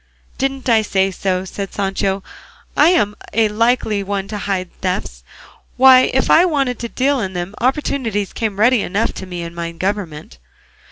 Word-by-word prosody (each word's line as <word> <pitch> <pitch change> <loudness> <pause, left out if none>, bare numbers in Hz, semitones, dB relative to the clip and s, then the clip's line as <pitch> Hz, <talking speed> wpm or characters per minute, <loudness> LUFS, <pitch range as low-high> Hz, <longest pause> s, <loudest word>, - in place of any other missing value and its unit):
"Didn't 270 -1 -2
I 225 -3 +4
say 195 -2 0
so?" 185 0 -2
said 195 +1 -6
Sancho. 195 -1 -1 0.5
"I'm 300 - +4 0.2
a 220 0 +3
likely 220 -1 +1
one 195 0 -3
to 210 - -4
hide 190 -3 -3
thefts! 180 - -3 0.5
Why 255 0 +7
if 265 - +1
I 330 - +7
wanted 275 -8 0
to 235 - -5
deal 275 +3 +1
in 190 -4 -3
them, 175 +2 -4
opportunities 245 -6 -1
came 210 -3 -3
ready 240 +1 +4
enough 205 +5 -1
to 190 - -8
me 175 -2 -5
in 170 0 -7
my 170 0 -4
government." 165 - -4
205 Hz, 165 wpm, -18 LUFS, 190-250 Hz, 0.5 s, Why